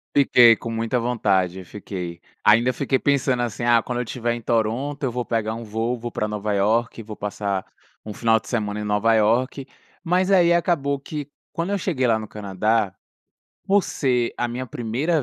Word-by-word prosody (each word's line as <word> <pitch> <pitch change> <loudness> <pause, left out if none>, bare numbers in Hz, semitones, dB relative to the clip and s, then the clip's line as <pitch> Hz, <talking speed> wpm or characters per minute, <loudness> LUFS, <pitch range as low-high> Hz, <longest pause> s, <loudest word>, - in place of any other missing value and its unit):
Fiquei 120 -5 +6
com 115 - -6
muita 115 +2 -1
vontade, 95 -6 0
fiquei. 90 -3 -7 0.2
Ainda 115 +4 +5
fiquei 135 0 0
pensando 135 -3 +1
assim: 120 0 -3
"Ah, 120 -1 +4
quando 125 -1 -3
eu - - -1
tiver 120 0 -2
em 120 - -7
Toronto, 120 +6 -1
eu 130 - 0
vou 125 0 -3
pegar 110 -1 -1
um 115 +1 -7
voo, 115 +3 -2
vou 120 0 -6
pra 105 -2 -2
Nova 105 0 -2
Iorque, 115 +4 +1
vou 110 -1 -9
passar 100 -2 -3 0.4
um 105 - -6
final 115 +1 +2
de 110 - -18
semana 105 -3 -2
em - - -4
Nova 105 +2 +2
Iorque", 120 +5 +1 0.4
mas 185 +3 +1
aí 175 -3 +5
acabou 150 -5 +1
que 145 0 -6 0.2
quando 170 +4 -3
eu 200 - +1
cheguei 150 -9 0
lá 110 -2 +3
no 110 - -7
Canadá, 105 0 -1 0.7
por 200 0 +4
ser 125 -4 0
a 120 - 0
minha 125 +2 -5
primeira 130 +7 -1
115 Hz, 190 wpm, -23 LUFS, 105-130 Hz, 0.7 s, Fiquei